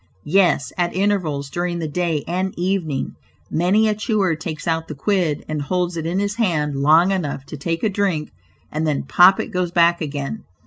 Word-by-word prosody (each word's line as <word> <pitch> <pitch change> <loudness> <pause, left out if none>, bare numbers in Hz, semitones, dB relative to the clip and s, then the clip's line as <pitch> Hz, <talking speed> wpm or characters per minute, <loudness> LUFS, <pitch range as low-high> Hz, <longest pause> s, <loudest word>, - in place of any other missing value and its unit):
yes, 170 -6 +2
at 175 0 0
intervals 180 -8 0
during 175 +1 -2
the 165 -2 -3
day 165 -1 -1
and 185 +2 -2
evening, 175 -6 -1 0.4
many 190 +7 +3
a 215 - +2
chewer 210 -5 0
takes 155 0 -6
out 160 -1 0
the 150 - -6
quid 165 -1 0
and 155 -1 -3
holds 180 +3 -1
it 165 -1 -3
in 175 +3 -1
his 205 +2 -1
hand 155 -10 0
long 155 +7 +4
enough 150 -8 -2
to - - -8
take 165 +3 -3
a - - +4
drink, 190 -6 -1 0.4
and 155 +1 -1
then 150 -2 0
pop 180 +7 +6
it - - -3
goes 180 -1 -1
back 170 0 +3
again. 145 +6 -4
170 Hz, 190 wpm, -21 LUFS, 155-190 Hz, 0.4 s, pop